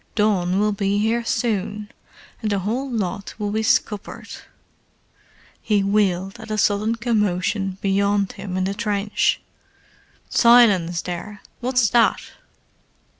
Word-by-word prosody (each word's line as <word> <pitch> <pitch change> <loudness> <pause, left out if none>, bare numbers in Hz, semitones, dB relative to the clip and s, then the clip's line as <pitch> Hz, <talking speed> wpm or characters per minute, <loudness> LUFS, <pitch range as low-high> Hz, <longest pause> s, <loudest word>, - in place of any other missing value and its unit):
Dawn 195 -4 +1
will 210 +1 +2
be 200 0 0
here 225 +3 +1
soon, 210 -2 -2 0.5
and 215 -2 -1
the 200 - +1
whole 230 +8 -2
lot 200 -4 -3
will 205 -1 -3
be 220 +1 0
scuppered." 210 -2 -1 1.3
He 205 -2 +1
wheeled 195 -2 0
at - - -10
a 215 - -2
sudden 210 +2 +1
commotion 205 -4 -1
beyond 200 0 +1
him 185 -2 -6
in 185 - 0
the 195 +1 -1
trench. 205 -1 0 0.9
"Silence 205 -9 +4
there! 190 +4 -6 0.2
What's 250 -2 +2
that?" 235 -1 +4
205 Hz, 125 wpm, -22 LUFS, 195-220 Hz, 1.3 s, Silence